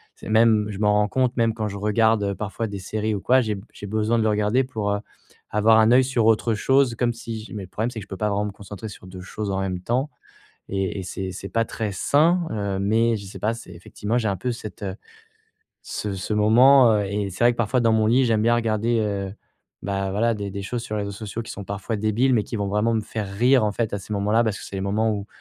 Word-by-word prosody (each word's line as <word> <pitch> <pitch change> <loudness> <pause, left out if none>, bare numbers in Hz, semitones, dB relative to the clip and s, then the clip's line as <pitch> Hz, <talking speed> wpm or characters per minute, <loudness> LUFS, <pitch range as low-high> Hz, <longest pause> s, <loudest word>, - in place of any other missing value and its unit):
c'est - - -10
même, 110 -1 +4
je 100 - -6
m'en 105 -1 +3
rends 105 0 +3
compte 130 +2 +1
même 115 -1 +2
quand 110 -1 -2
je 100 - -6
regarde 105 0 +2
parfois 110 +2 -4
des 100 -1 -6
séries 105 +3 -2
ou - - -3
quoi, 130 +1 +4
j'ai 110 -3 -1
b 95 - -9
j'ai 100 - -8
besoin 110 +2 +1
de 110 - +2
le 110 - +2
regarder 105 +5 +2
pour, 110 -6 -3
heu, 100 - 0 0.5
avoir 110 +1 +5
un 110 +1 +5
oeil 130 +2 +6
sur 125 -4 +1
autre 115 +1 +3
chose 135 +3 +3
comme 120 0 0
si 115 -1 -6
j - - -11
mais 100 - -5
le - - -9
problème, 110 +5 -2
c'est 115 - -6
que - - -8
je - - -35
peux 95 - -6
pas 105 +2 0
vraiment 105 +1 0
me 105 - -4
concentrer 100 +2 -9
sur 95 -2 -12
2 90 0 -9
choses 105 +2 -5
en 95 - -1
même 95 -2 -2
temps 130 +9 -1 0.6
et 95 0 -2
et - - -5
c'est 95 +1 -5
c'est 100 +1 -7
pas 115 0 +1
très 105 -2 -3
sain, 165 - +3
heu, 100 -2 -2
mais 115 +3 +2
je 100 - -8
sais 95 - -9
pas, 110 +2 0
c'est 115 -6 -11
effectivement 105 +6 -3
j'ai 115 - -1
un 100 - -1
peu 125 +8 -3
cette, 110 -3 -9
heu, 95 0 -4 0.9
ce 105 -2 -4
ce 95 +3 -4
moment, 120 +4 +6
heu - - -1
et 100 0 -2
c'est 95 +6 -1
vrai 120 - +6
que 120 - -12
parfois 120 +3 +1
dans 115 -1 +3
mon 110 -1 +3
lit, 125 +4 +4
j'aime 110 -2 +2
bien 120 +1 +4
regarder, 115 0 0
heu, 100 -2 -2 0.5
bah, 95 -1 -2
voilà 115 +4 +1
des 100 -1 -5
des 100 0 -5
choses 120 +3 -4
sur 110 -2 -4
les 105 - -1
réseaux 100 - -5
sociaux 110 +2 -6
qui 115 - -8
sont 100 - -7
parfois 100 +3 -4
débiles 110 +5 +1
mais 110 - +3
qui - - -5
vont 100 -1 -2
vraiment 105 +3 +1
me 110 - 0
faire 105 -1 -5
rire 125 +4 +4
en 105 - +1
fait 115 0 -2
à 100 - -2
ces 105 - -9
moments-là 105 +3 +2
parce 105 -3 -1
que - - -9
c'est 100 - -7
le - - -3
moment 110 +3 +1
où 100 -1 -4
105 Hz, 275 wpm, -23 LUFS, 100-115 Hz, 0.9 s, oeil